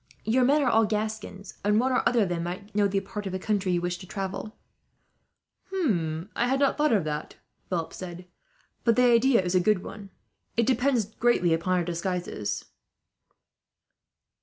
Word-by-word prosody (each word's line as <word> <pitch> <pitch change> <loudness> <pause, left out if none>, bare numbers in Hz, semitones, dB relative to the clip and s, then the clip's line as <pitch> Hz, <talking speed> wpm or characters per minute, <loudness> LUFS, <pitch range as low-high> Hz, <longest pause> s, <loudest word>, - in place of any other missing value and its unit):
Your 245 +4 +3
men 285 +4 +4
are - - +1
all 225 0 +4
Gascons, 215 -2 -4
and 210 +1 +3
one 260 +2 +1
or 250 - +3
other 235 -3 +3
of 190 - -2
them 175 -1 -2
might 185 +5 -6
know 205 0 +3
the 195 0 0
part 205 +1 -6
of - - -4
the 185 - -2
country 195 -1 0
you 175 - +1
wish 175 0 -2
to 185 - -11
travel." 195 +3 -5 1.1
"I 195 - -1
had 265 +2 +1
not 280 -1 +3
thought 300 -1 +2
of 200 -8 +2
it," 150 0 -4 0.3
Philip 170 -3 -2
said; 180 -1 -8 0.6
"but 230 -2 +3
the 250 - +4
idea 240 -2 +4
is 180 0 -1
a 185 - +5
good 185 +1 +2
one. 200 -1 -9 0.5
It - - +5
would 255 +3 +3
depend 240 -4 0
greatly 225 -8 +3
upon 170 +3 0
our 175 - +1
disguises." 175 - -3
200 Hz, 185 wpm, -27 LUFS, 180-235 Hz, 1.1 s, a